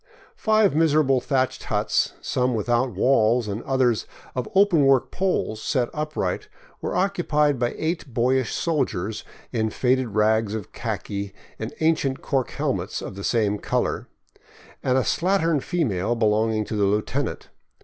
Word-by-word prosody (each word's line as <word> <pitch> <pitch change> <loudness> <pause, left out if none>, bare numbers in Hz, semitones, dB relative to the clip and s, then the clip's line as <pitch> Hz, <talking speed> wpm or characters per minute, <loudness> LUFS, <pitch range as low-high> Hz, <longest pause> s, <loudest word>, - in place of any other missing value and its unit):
Five 215 -6 +3
miserable 150 -5 +3
thatched 130 -1 -1
huts, - - 0
some 125 -1 0
without 120 +4 +1
walls 115 +2 +3
and 105 +2 -3
the - - -16
others 130 -4 +1 0.3
of 125 - -3
open 190 -6 +5
work 135 -2 +3
poles 185 - -1
set 125 -2 0
upright, 150 -11 -2 0.3
were - - -3
occupied 155 -7 +1
by 120 -1 0
eight 160 -4 -3
boyish 125 +1 +1
soldiers 110 - -1 0.3
in 110 -3 0
faded 125 -1 0
rags 110 0 +2
of 105 -4 -6
khaki 100 -1 -4 0.2
and 110 - -4
ancient 155 -4 +1
cork 135 -3 0
helmets - - -2
of - - -6
the 100 +1 -8
same 105 -3 +1
color, - - -1 0.7
and 130 0 +2
a - - +4
slattern 165 -2 +1
female 120 - 0
belonging 110 -1 +1
to 110 - -4
the 105 -1 +2
lieutenant. 105 +8 -1
125 Hz, 145 wpm, -24 LUFS, 110-150 Hz, 0.7 s, open